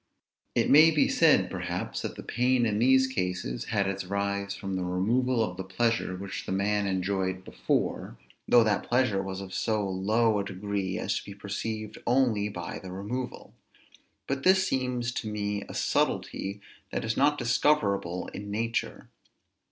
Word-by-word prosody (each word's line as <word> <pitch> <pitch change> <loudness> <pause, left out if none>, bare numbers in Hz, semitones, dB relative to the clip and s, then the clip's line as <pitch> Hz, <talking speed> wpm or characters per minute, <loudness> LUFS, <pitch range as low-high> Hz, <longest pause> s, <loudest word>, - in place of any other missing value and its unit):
It - - +2
may 155 +3 +9
be 155 -2 +3
said, - - +4
perhaps, - - -3
that - - -4
the - - -8
pain 125 +1 +2
in 105 -2 0
these 130 +2 +5
cases 90 - -3
had 100 -2 0
its 95 0 -2
rise 100 +1 -2
from 95 -1 -4
the 95 - -1
removal 115 +7 +1
of 90 -4 -4
the 95 - -4
pleasure 95 0 0
which 95 +1 -6
the - - -3
man 100 +1 +1
enjoyed 95 0 -1
before, - - -2 0.3
though 120 - +6
that 105 -2 +1
pleasure 120 -6 +2
was 95 0 -5
of 95 -1 -8
so 105 -2 0
low 105 +4 +2
a - - 0
degree 100 -1 -3
as - - -1
to - - -13
be 100 - -9
perceived 105 +2 -5
only 120 -5 +2
by 85 -4 -6
the 95 - -9
removal. 115 +7 -5 0.7
But 135 0 -2
this 190 +3 +4
seems 125 -2 -1
to 110 -2 -4
me 105 -1 -2
a - - -7
subtilty 100 +1 -1 0.3
that - - -2
is 110 0 -1
not 145 +2 +3
discoverable 115 - +1
in 100 0 -7
nature. 115 +3 -3
105 Hz, 165 wpm, -28 LUFS, 95-120 Hz, 0.7 s, may